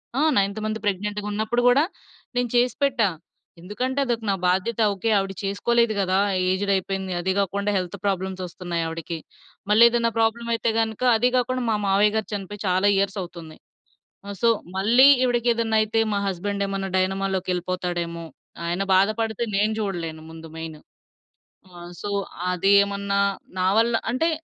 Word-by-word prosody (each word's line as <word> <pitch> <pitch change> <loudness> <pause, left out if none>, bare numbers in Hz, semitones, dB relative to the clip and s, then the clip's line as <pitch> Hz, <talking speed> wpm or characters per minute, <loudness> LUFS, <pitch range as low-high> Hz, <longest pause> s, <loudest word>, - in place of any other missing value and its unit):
ఆ! 280 - +1 0.2
Ninth 200 +2 +1
month 215 0 -2
ప్రెగ్నెంట్‌గా 205 +1 -2
ఉన్నప్పుడు 220 +3 0
గూడా 270 +5 +5 0.5
నేను 245 -1 0
చేసిపెట్టా. 250 -2 +2 0.5
ఎందుకంటే 255 +9 -3
అదొక 235 -2 -2
నా - - +3
బాధ్యత. 190 +5 0
ఓకే 210 +4 -2
ఆవిడ 195 0 -1
చేసుకోలేదు 235 +3 +1
గదా! 190 0 +1 0.3
ఏజ్డ్ 200 +2 0
అయిపోయింది. 190 0 -3
అదీ 190 +2 -1
గాకుండా 200 +1 0
హెల్త్ 185 +2 -4
ప్రాబ్లమ్స్ 190 -1 -2
ఓస్తున్నయి 175 -1 -4
ఆవిడికి. 165 +1 -5 0.5
మళ్ళీ 220 +3 +7
ఏదన్నా 230 -1 +1
ప్రాబ్లమైతే 230 +1 0
గనుక 220 +1 -2
అదీ 245 +3 +3
గాకుండా 255 0 0
మా - - +2
మావయ్య 205 +2 +4
గారు 220 - -1
చనిపోయి 205 0 -6
చాలా 185 +2 +2
ఇయర్స్ 200 +1 0
అవుతుంది. 170 -3 -9 0.7
ఆ! - - -6
సో, 235 - +4 0.3
మళ్ళీ 240 +7 +6 0.2
ఈవిడకి 240 -1 +1
ఏదన్నా 225 -1 0
అయితే 225 +1 0
మా 200 - 0
హస్బెండ్ 200 +2 -2
ఏమన్నా 195 -1 -3
డైనమా‌లోకి 190 0 -1
ఎళ్ళిపోతాడేమో? 175 -2 -3 0.4
ఆయన 175 +3 -1
బాధపడితే 220 +3 +1
నేను 210 +2 +2
జూడలేను 170 -6 -4
ముందు 165 0 -10
మెయిన్. 160 -2 -7 1.0
ఆ! - - -10 0.2
సో, 205 - -4 0.4
అదేమన్నా 200 +1 +2 0.4
నా 185 - +2
వల్ల 230 +1 +3 0.2
అంటే 325 +7 +1
200 Hz, 145 wpm, -24 LUFS, 185-225 Hz, 1.0 s, మళ్ళీ